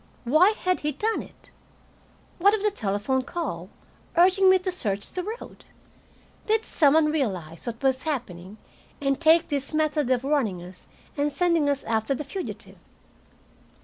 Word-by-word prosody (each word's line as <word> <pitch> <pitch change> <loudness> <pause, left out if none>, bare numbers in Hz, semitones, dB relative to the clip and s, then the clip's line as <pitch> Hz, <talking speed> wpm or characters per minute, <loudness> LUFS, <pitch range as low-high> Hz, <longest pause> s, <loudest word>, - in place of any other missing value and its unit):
Why 310 - +4
had 365 0 +1
he 300 0 -2
done 435 +11 -1
it? - - -16 0.9
What 400 +4 +5
of 420 - -5
the 420 - +2
telephone 215 - -1
call, 255 - -5 0.5
urging 375 +2 +5
me 375 - +6
to 370 0 -3
search 205 - -2
the 365 - -3
road? 440 +6 -8 0.8
Did 440 +1 +1
some 290 -1 +3
one 310 -1 +4
realize 185 - -3
what 230 +2 -6
was 265 -1 +2
happening, 215 - -5 0.4
and 275 +1 -1
take 330 +1 +5
this 285 0 -2
method 305 -3 +1
of 255 -1 +1
warning 250 -11 0
us 180 +1 -12 0.3
and 290 0 0
sending 335 -2 +2
us 280 -1 0
after 225 +3 0
the 300 - -5
fugitive? 360 +7 -7
290 Hz, 155 wpm, -25 LUFS, 235-350 Hz, 0.9 s, me